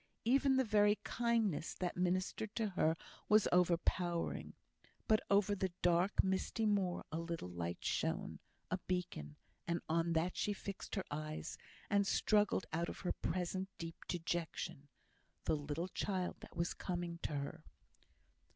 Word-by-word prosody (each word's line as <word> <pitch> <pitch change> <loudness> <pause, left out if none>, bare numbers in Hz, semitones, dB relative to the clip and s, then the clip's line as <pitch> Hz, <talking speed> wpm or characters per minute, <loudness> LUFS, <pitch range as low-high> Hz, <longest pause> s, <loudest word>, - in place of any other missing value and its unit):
Even 265 +3 +5
the 265 - +4
very 210 -2 +5
kindness 230 -9 +1
that 180 -1 -2
ministered 185 +4 0
to 220 -3 +1
her 160 -4 +2 0.3
was 215 -1 +6
overpowering. 175 -1 +1 0.5
But 215 -1 +5
over 200 0 +4
the 190 -2 0
dark, 175 +3 +4
misty 190 +4 0
moor 195 -4 +1
a 160 - -1
little 165 - -4
light 85 0 -4
shone, - - -1 0.3
a 185 - +1
beacon; 125 - -2 0.3
and 170 0 +1
on 165 +1 +2
that 165 +3 +1
she 205 - +1
fixed 200 +1 -6
her 190 - -1
eyes, 155 +1 -4 0.3
and 200 -1 +3
struggled 210 -2 +3
out 170 +1 0
of - - -7
her 180 - 0
present 185 +2 -1
deep 165 0 -7
dejection 170 -3 -2 0.6
the - - +2
little 150 +4 -3
child 185 -1 -1
that - - -12
was 170 +1 +1
coming 175 -2 -3
to - - -2
her! 140 0 -4
180 Hz, 145 wpm, -37 LUFS, 165-200 Hz, 0.6 s, was